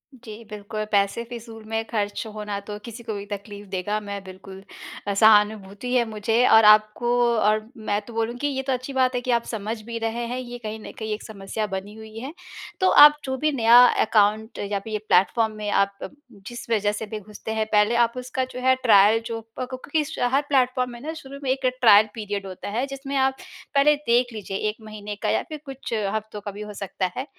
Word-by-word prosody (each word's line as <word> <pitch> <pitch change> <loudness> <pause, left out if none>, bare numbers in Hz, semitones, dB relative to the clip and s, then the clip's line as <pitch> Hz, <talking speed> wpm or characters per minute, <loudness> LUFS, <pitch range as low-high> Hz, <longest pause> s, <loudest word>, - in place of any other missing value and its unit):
जी, 230 -2 -11
बिल्कुल। 210 +1 -5
पैसे 200 +3 +1
फ़िज़ूल 230 -1 -10
में 225 0 -1
खर्च 205 -3 -2
होना 210 -1 -4
तो 205 +1 -8
किसी 235 0 -9
को 220 - -4
भी 200 0 -6
तकलीफ़ 205 0 -8
देगा 200 +3 -2
मै 200 -1 -6
बिल्कुल 190 0 -12 0.4
अ, 200 - 0
सहानुभूति 210 +1 +3
है 250 -2 +4
मुझे 220 +3 +1
और 220 -1 +7
आपको 215 +2 +5 0.3
और 215 +1 +2 0.2
मैं 205 0 +2
तो 235 - -11
बोलूँगी 235 +5 -2
ये 270 -2 -2
तो 265 - +2
अच्छी 255 +2 -5
बात 255 -1 +2
है 245 - 0
कि 250 - -2
आप 235 -1 +2
समझ 220 0 -4
भी 230 +2 -6
रहे 225 +1 -2
हैं। 250 +2 -3
ये 245 -1 -7
कहीं 215 0 -5
न - - -9
कहीं 220 -1 -3
एक 210 - -6
समस्या 210 0 -5
बनी 195 +1 -5
हुई 220 0 -11
है, 265 +6 -7 0.5
तो 375 -1 +4
आप 295 0 +9
जो 265 0 -2
भी 305 +3 +1
नया 235 -3 +6 0.3
अकाउंट 215 +1 +1
या 200 0 -2
फिर 215 +2 -8
ये 215 - -1
प्लेटफॉर्म 220 +4 +3
में 210 -1 -4
आप 200 0 +1 0.5
जिस 240 -1 -8
वजह 210 -2 +2
से 210 +1 -5
भी 215 0 -6
घुसते 210 +2 -8
हैं, 220 0 0
पहले 210 +2 +3
आप 235 -1 +3
उसका 255 +1 -3
जो 250 - -5
है 260 +1 +4
ट्रायल 215 -1 +6
जो 230 -1 -4 0.2
प 255 - -1
को 255 - -4
कि 310 0 +2
स - - -7 0.2
हर 275 - +4
प्लेटफॉर्म 255 -2 +2
में 240 - -9
ना 305 +4 -4
शुरू 280 -3 -10
में 265 - -2
एक 265 0 -2 0.2
ट्रायल 215 -2 +7
पीरियड 205 -3 -4
होता 185 +1 -7
है, 235 +6 -1
जिसमें 275 0 -6
आप 265 0 +2 0.4
पहले 290 +2 +5
देख 240 +1 +2
लीजिए 200 -3 -5
एक 210 - -5
महीने 210 -1 -7
का - - 0
या - - +1
फिर 310 -1 -6
कुछ 270 -3 -7 0.2
हफ्तों 215 -1 -5
का 205 - -6
भी 205 +2 -9
हो 210 0 -7
सकता 195 -2 -3
है। 260 - -2
220 Hz, 225 wpm, -24 LUFS, 205-245 Hz, 0.5 s, आप